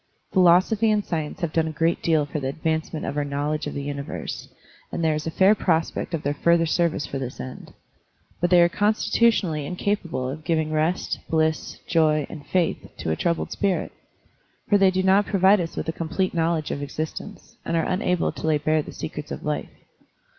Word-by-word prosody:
Philosophy 185 +5 +4
and 210 -1 +1
science 160 +2 -3
have 170 -3 -2
done 160 -1 +2
a - - -3
great 165 +2 0
deal 160 -3 +2
for 150 +1 -4
the 135 - -3
advancement 160 +2 -2
of - - -3
our 145 - 0
knowledge 145 +2 -2
of - - -5
the 140 - -3
universe, 140 0 -5 0.4
and 170 - -3
there 160 -1 +3
is 155 +1 -3
a - - +1
fair 190 +5 +5
prospect 165 -3 0
of 155 - -5
their 145 - 0
further 170 +2 +3
service 165 -2 +1
for 135 - -4
this 130 -2 -6
end. 130 0 -8 0.7
But 175 - +1
they 175 -1 +7
are - - +5
con 205 +5 +2
stitutionally 200 -11 +2
incapable 180 -5 -2
of 150 +4 -6
giving 160 -2 0
rest, 155 +3 0
bliss, 160 -1 0
joy, 155 -3 +2
and 150 -4 -8
faith 180 -3 +1 0.2
to 80 - -2
a - - +1
troubled 170 - -1
spirit; 200 -3 -1 0.8
for 205 - +4
they 195 -1 +6
do 185 0 0
not 195 +2 +4
provide 195 0 +4
us 165 - -5
with - - -3
a - - +1
complete 175 +4 -1
knowledge 165 -2 0
of 140 - -3
exist 155 +2 -4
ence, - - -13
and 165 - -1
are 165 - +1
unable 180 -2 0
to - - -5
lay 155 -1 +3
bare 155 +1 +1
the - - -9
secrets - - -6
of - - -6
life. - - -2
165 Hz, 205 wpm, -24 LUFS, 150-180 Hz, 0.8 s, they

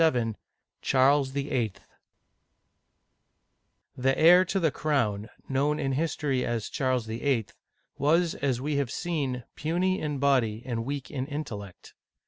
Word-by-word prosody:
LVIL 125 -8 +2 0.5
CHARLES 135 +1 +3
VIIL 130 -6 -1 2.2
THE 135 +1 +1
heir 175 +3 +7
to 195 +2 0
the 160 -4 +2
crown, 120 -9 0 0.2
known 145 +3 +1
in 135 -2 0
history 140 -2 0
as 115 -2 -2
Charles 130 -3 0
VHL, 115 0 -1 0.5
was, 165 +4 +3
as 135 -4 -1
we 145 +2 -1
have 140 -4 0
seen, 140 -6 -2
puny 180 +5 0
in 150 -2 -2
body 125 -5 +2
and 115 -3 -3
weak 140 0 -4
in 130 -1 -3
intellect. 110 - -7
135 Hz, 125 wpm, -28 LUFS, 125-150 Hz, 2.2 s, heir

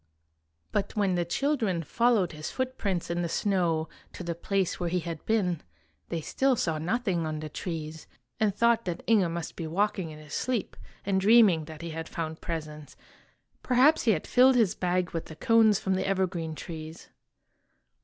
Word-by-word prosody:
But 195 - -2
when 200 -3 +2
the 175 -1 0
children 210 - 0
followed 230 -1 +2
his 155 -1 -6
footprints 210 -10 -2
in 175 0 -1
the 170 - -2
snow 170 -5 0 0.3
to - - -7
the 170 -1 -2
place 190 +2 -1
where 175 -1 -1
he 180 +1 0
had 165 -2 -6
been, 185 -7 +1 0.5
they 165 - -2
still 265 - +1
saw 160 -8 -1
nothing 180 -2 -1
on 155 -1 -3
the 155 0 -6
trees, 160 -1 -6 0.3
and 215 -2 +3
thought 235 +1 +3
that 175 -2 -4
Inge 210 -6 +4
must 170 0 -5
be 165 - -5
walking 190 0 0
in 155 - -9
his 150 -1 -12
sleep, 250 -5 -2 0.3
and 190 -1 +1
dreaming 200 -6 +5
that 155 0 -10
he 170 - -5
had 160 0 -6
found 160 -1 -5
presents. 150 -4 -6 0.6
Perhaps 260 +5 +4
he 225 - +5
had 155 - -3
filled 255 +1 +5
his 225 -7 +3
bag 180 0 -1
with 165 - -4
the 160 - -10
cones 220 +3 +4
from 190 - -1
the 190 0 -1
evergreen 185 -4 -1
trees. 160 0 -8
180 Hz, 180 wpm, -28 LUFS, 160-215 Hz, 0.6 s, dreaming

